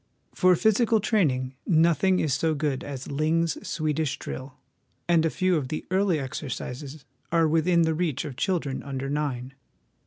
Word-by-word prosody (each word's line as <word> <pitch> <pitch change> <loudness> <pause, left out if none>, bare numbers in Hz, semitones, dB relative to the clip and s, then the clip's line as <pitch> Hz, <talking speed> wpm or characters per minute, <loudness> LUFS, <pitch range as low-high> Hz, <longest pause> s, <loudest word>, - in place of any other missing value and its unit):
For 185 -1 +4
physical 220 +3 +3
training 140 - +1
nothing 170 +3 +3
is 150 -4 +1
so 160 +3 +1
good 145 -2 -1
as 140 -1 -6
Ling's 160 +3 +1
Swedish 155 -2 -1
Drill, 130 -1 -7 0.5
and 165 -2 +4
a - - 0
few 185 +1 +1
of 140 -4 -2
the 155 +4 -4
early 190 -3 +2
exercises 135 +1 -6 0.3
are 165 -1 +4
within 165 +2 +3
the 160 0 +1
reach 160 -4 -1
of 140 -4 -6
children 150 -2 -1
under 135 -1 -4
nine. 135 -3 -2
155 Hz, 155 wpm, -26 LUFS, 140-170 Hz, 0.5 s, For